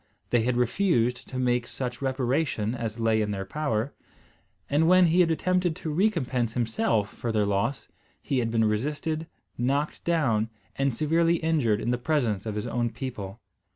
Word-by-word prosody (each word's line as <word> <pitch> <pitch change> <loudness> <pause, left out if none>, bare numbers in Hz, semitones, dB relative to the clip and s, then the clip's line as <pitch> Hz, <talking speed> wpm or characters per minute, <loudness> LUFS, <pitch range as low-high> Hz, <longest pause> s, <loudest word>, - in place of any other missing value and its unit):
They 120 - +4
had 120 +2 0
refused 125 - +1
to 130 - -6
make 125 -1 +1
such 125 -1 -5
reparation 130 -3 0
as 115 -2 -4
lay 110 -1 +2
in 105 - -1
their 95 -1 -3
power; 140 -4 -2 0.7
and, 150 +3 +2
when 185 +1 +6
he 170 +2 +3
had 175 -2 +5
attempted 180 +1 +1
to 160 -3 -4
recompense 135 - +1
himself 115 -3 0
for 120 - -3
their 105 -2 +2
loss, 110 +7 -1 0.3
he 135 -4 -1
had 115 -2 0
been 115 -1 +2
resisted, 150 +8 -1 0.3
knocked 140 +5 0
down, 120 -11 +1 0.3
and 135 0 +1
severely 165 +6 +2
injured 155 -10 +1
in 120 - -1
the 125 - 0
presence 120 -8 0
of 105 - -3
his 105 - -3
own 120 -1 0
people. 115 -4 -6
125 Hz, 170 wpm, -27 LUFS, 115-155 Hz, 0.7 s, when